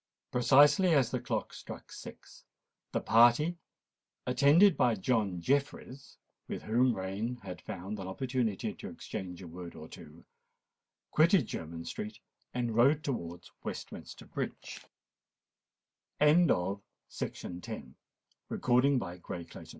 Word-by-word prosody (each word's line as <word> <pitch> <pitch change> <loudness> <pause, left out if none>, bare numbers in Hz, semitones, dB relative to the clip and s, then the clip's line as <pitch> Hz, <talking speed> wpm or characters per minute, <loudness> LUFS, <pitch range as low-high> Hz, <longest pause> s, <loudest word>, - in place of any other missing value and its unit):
Precisely 145 +8 +5
as 130 -5 +3
the 125 - 0
clock 120 - -3
struck - - -9
six, - - -11 0.5
the - - 0
party, 120 +9 +5 0.7
attended 145 +9 +5
by 120 -2 +3
John 100 -3 0
Jeffreys, 140 +4 -2 0.3
with - - -5
whom 120 +2 +3
Rain 100 +6 -3
had 90 -2 -7
found 100 0 -6
an 95 - -5
opportunity 120 0 -1
to - - -8
exchange 90 -1 -7
a - - -8
word 85 +1 -9
or 80 - -9
two, 80 +1 -13 0.9
quitted 165 - +5
Jermyn 80 -2 -6
Street, 105 0 -5 0.3
and 120 -2 -2
rode 140 +6 +4
towards 90 - -5
Westminster - - -7
Bridge. - - -5
120 Hz, 100 wpm, -31 LUFS, 95-140 Hz, 0.9 s, Precisely